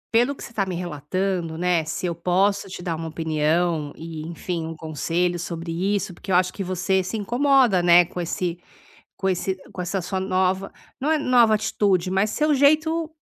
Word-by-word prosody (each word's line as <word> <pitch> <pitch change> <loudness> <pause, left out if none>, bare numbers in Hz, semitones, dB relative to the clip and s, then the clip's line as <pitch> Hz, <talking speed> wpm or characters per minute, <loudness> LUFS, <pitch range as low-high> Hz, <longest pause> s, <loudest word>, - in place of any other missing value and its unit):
pelo 245 +5 +3
que - - -11
você - - -10
tá 210 - +1
me 185 -2 -4
relatando, 175 +1 -2
né, 175 -1 +1
se 160 +3 -4
eu 170 - 0
posso 190 +4 +1
te 185 -1 -8
dar 170 -2 -2
uma 165 0 -5
opinião 160 0 0
e 160 -1 -7
enfim, 170 0 -4
um 165 - -6
conselho 165 +3 -1
sobre 170 -1 -5 0.2
isso, 195 -2 -3
porque 190 +3 -7
eu - - +4
acho 185 0 +3
que 195 - -4
você 185 +1 0
se 200 +5 -4
incomoda, 245 -2 +3
né, 175 0 +6
com 180 +1 -6
esse 175 0 -3 0.6
com 190 - -1
esse 190 +1 0 0.2
com 180 - -8
essa 185 +1 -2
sua 190 +2 -3
nova 190 0 0 0.3
não 300 +4 +1
é - - +3
nova 245 -6 +4
atitude, 200 -4 +1
mas 195 +3 +1
seu 305 +4 +1
jeito, 310 +3 +3
185 Hz, 195 wpm, -23 LUFS, 170-200 Hz, 0.6 s, né